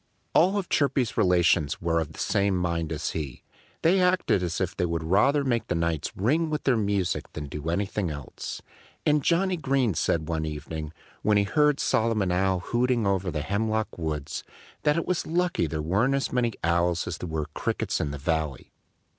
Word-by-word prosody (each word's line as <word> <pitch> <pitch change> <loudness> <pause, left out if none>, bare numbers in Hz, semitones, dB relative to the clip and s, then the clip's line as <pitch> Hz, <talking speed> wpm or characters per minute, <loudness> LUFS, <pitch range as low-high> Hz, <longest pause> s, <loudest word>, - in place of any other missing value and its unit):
All 195 +3 +4
Chirpy's 140 -8 +1
relations 85 -5 +3
were 85 -1 +1
of 80 -2 -3
the - - -13
same 100 -1 +1
mind 85 -2 -1
as 80 0 -2
he. 70 -6 -5 0.4
They 185 +3 +4
acted 180 - +2
as 85 -2 -2
if 95 -1 -1
they 90 - 0
would 85 -1 -2
rather 105 - +3
make 120 -4 0
the 90 - -1
nights 85 -2 -1
ring 150 - +1
with 150 -1 -2
their 135 - +3
music 100 -4 -1
than 75 - -5
do 75 +3 -5
anything 95 +1 -1
else. 75 -3 -7 0.4
And 150 -1 +3
Johnnie 180 +3 +2
Green 135 - +1
said 80 0 0
one 80 -2 -1
evening, 75 0 -5 0.3
when 105 0 +3
he 100 - +4
heard 150 +7 +2
Solomon 110 -5 +1
Owl 95 0 +1
hooting 120 +1 +1
over 95 -1 +1
in 90 - -2
the 75 -2 -2
hemlock 110 +4 -1
woods, 75 -4 -4 0.4
that 150 +1 +2
it 165 - 0
was 180 -2 -1
lucky 175 - +1
there 75 0 -3
weren't 105 - +2
as 140 - -1
many 120 -2 +1
Owls 85 +1 +2
as - - -5
there 90 - -5
were 80 -1 -2
Crickets - - -1
in 75 - -1
the 70 - -5
valley. 75 -2 -2
95 Hz, 190 wpm, -26 LUFS, 80-130 Hz, 0.4 s, All